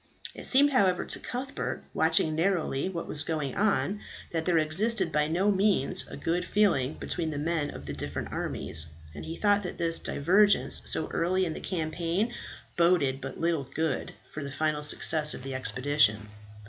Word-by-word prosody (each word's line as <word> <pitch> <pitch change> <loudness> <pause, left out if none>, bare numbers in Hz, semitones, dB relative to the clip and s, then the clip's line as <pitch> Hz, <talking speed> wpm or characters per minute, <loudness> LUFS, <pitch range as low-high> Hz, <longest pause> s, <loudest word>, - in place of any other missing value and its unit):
It - - -5
seemed, 285 +2 +5
however, 190 -8 +2
to - - 0
Cuthbert, 260 +3 -5
watching 160 -1 +2
narrowly 165 -3 0
what 170 -3 -5
was 145 - -3
going 150 -4 -3
on, 205 0 0 0.3
that 165 -1 -2
there 175 -2 +2
existed 185 +4 +1
by 150 0 +1
no 185 +6 +1
means 195 -1 +3
a - - -9
good 175 +2 -1
feeling 175 -9 +1
between 165 -2 -3
the 150 - -4
men 155 0 -1
of 70 - -9
the 75 - -5
different 75 - -4
armies; 80 0 +1 0.3
and 75 - -8
he 165 - -6
thought 205 -1 +3
that 180 - -6
this 165 -1 0
divergence 200 +7 +2
so - - 0
early 185 +2 0
in 165 - -3
the - - -7
campaign 170 +4 -2 0.4
boded 165 -6 +2
but 135 0 -7
little 165 -5 -1
good 160 -3 -2 0.2
for 155 - -6
the 140 - -6
final 150 +1 -1
success 150 +1 +3
of - - -9
the 135 0 -5
expedition. 125 -5 +1
165 Hz, 175 wpm, -28 LUFS, 145-190 Hz, 0.4 s, seemed